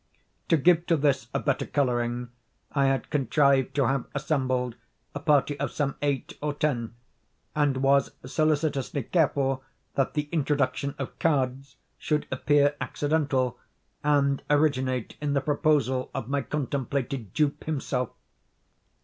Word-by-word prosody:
To 165 - +5
give 170 +3 +4
to 165 - +3
this 140 -5 +1
a - - 0
better 140 -3 -1
coloring, 120 -3 0 0.4
I 140 -1 +2
had 135 -3 0
contrived 140 -1 +2
to 140 -2 +3
have 135 +1 0
assembled 130 -4 0 0.4
a 145 - -4
party 145 -1 +2
of - - -1
some 145 -2 -1
eight 140 -2 -2
or 150 -1 -2
ten, 120 -7 -1 0.6
and 145 -3 +2
was 140 0 +4 0.2
solicitously 145 -2 0
careful 135 -4 +1 0.3
that 135 +1 0
the 150 -1 -1
introduction 140 -2 0
of 135 - -6
cards 135 -3 0 0.2
should 150 -1 0
appear 145 +2 +3
accidental, 145 -4 0 0.4
and 140 -2 +2
originate 130 -5 +1
in 145 -1 0
the 140 - +3
proposal 145 -3 +1
of 115 - -3
my 140 +1 0
contemplated 135 -5 -3
dupe 150 -2 0
himself. 135 -5 -1
140 Hz, 130 wpm, -27 LUFS, 130-150 Hz, 0.6 s, To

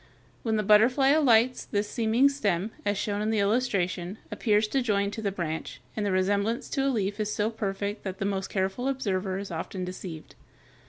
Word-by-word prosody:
When 225 -2 0
the 215 - +1
butterfly 230 +7 +5
alights, 255 -5 +4
this 205 -1 -1
seeming 230 +5 +3
stem, 210 -8 0 0.2
as 205 0 +1
shown 205 0 -1
in 215 - 0
the 220 - +1
illustration, 200 -4 0
appears 215 -2 +2
to 270 +4 +1
join 200 -4 +1
to 220 - -5
the 200 -2 -1
branch, 170 -4 -4 0.2
and 215 - -1
the 200 - 0
resemblance 200 +5 0
to 275 -2 +1
a - - +3
leaf 205 -4 -1
is 210 0 -1
so 210 +1 0
perfect 205 -1 -3
that 190 -1 -5
the 195 - -2
most 195 -1 -1
careful 195 +6 -1
observer 195 -8 -1
is 195 -1 -6
often 180 +3 -4
deceived. 180 -3 -8
205 Hz, 195 wpm, -27 LUFS, 195-225 Hz, 0.2 s, butterfly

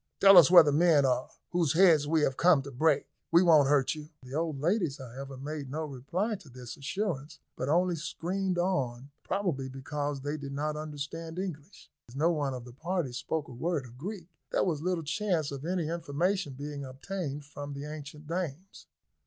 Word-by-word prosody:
"Tell 195 0 +8
us 160 - +7
where 175 -2 +10
the 145 - +2
men 155 -2 +4
are, 125 -1 +1 0.2
whose 170 -5 +2
heads 160 -4 +5
we 160 0 +2
have 135 -3 +1
come 165 -4 +4
to 140 - -8
break. 145 +2 +2 0.3
We 170 +2 +6
won't 155 -5 +6
hurt 140 -2 +3
you." 150 -1 -9
The 130 +1 -10
old 155 -2 -1
ladies, 170 -2 +1
however, 135 +1 -8
made 145 0 -5
no 155 +3 -3
reply 155 - -2
to 175 -7 -16
this 125 -1 -9
assurance; 155 -1 -3 0.2
but 130 - -3
only 175 +3 +3
screamed 180 +4 -2
on, 140 -8 -1
probably 155 -10 -2
because 145 +1 -4
they 145 +2 -3
did 140 -2 -7
not 150 +2 -2
understand 155 +2 -6
English. 180 -1 -7 0.2
As 120 - -13
no 160 +5 +3
one 145 -5 -1
of 125 -1 -7
the 125 - -11
party 165 -1 -2
spoke 140 +5 -3
a - - -11
word 150 +2 -1
of 125 +1 -14
Greek, 190 +2 -5 0.3
there - - +2
was 160 -6 -1
little 180 -1 -1
chance 160 -2 0
of 140 +1 -6
any 175 -2 -1
information 170 +1 -1
being 145 +1 -6
obtained 145 +2 -5
from 145 0 -7
the 140 +1 -6
ancient 150 0 -8
dames. 170 +2 -5
150 Hz, 195 wpm, -30 LUFS, 140-175 Hz, 0.3 s, where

